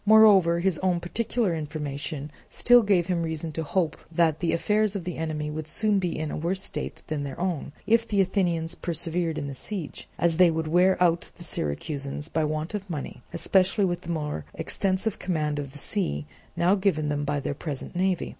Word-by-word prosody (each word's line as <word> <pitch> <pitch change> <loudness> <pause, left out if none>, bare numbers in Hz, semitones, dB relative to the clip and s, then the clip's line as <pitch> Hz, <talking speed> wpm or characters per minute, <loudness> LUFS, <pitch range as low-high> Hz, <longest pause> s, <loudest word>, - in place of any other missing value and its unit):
Moreover, 205 -6 +6
his 185 -2 +1
own 180 -2 +1
particular 210 +2 -1
information 150 -1 -4 0.2
still 245 0 +6
gave 195 -5 +3
him 175 -1 0
reason 160 -1 -2
to 160 - -3
hope 160 +1 0
that 160 -2 +2
the 170 - +1
affairs 210 +3 +1
of 195 - -3
the 180 0 -4
enemy 155 -2 -2
would 155 0 -5
soon 210 +4 +2
be 180 -3 -2
in 155 -1 -3
a - - -3
worse 185 +5 -1
state - - -5
than 155 -2 -3
their 140 -1 -6
own, 175 -6 -2
if 230 +1 +3
the 205 -2 +1
Athenians 175 -4 +1
persevered 170 -1 -2
in 145 - -3
the 140 - -5
siege; 170 +3 -5
as 170 -1 +2
they 180 -1 +7
would 160 -1 -1
wear 180 +4 +4
out 170 -1 +2
the 175 - -9
Syracusans 140 - -3
by 160 - 0
want 155 +3 -2
of 200 -2 -4
money, 150 -5 -5
especially 190 +4 +3
with 175 -1 -1
the 170 - -10
more 150 - -2
extensive 195 +2 -1
command 150 -5 -1
of 140 -2 -5
the 145 - -10
sea 145 - -1 0.3
now 175 +3 +3
given 185 -7 +1
them 145 0 -1
by 145 0 0
their 140 - -2
present 145 +2 -6
navy. 185 -1 +1
170 Hz, 200 wpm, -26 LUFS, 155-190 Hz, 0.3 s, they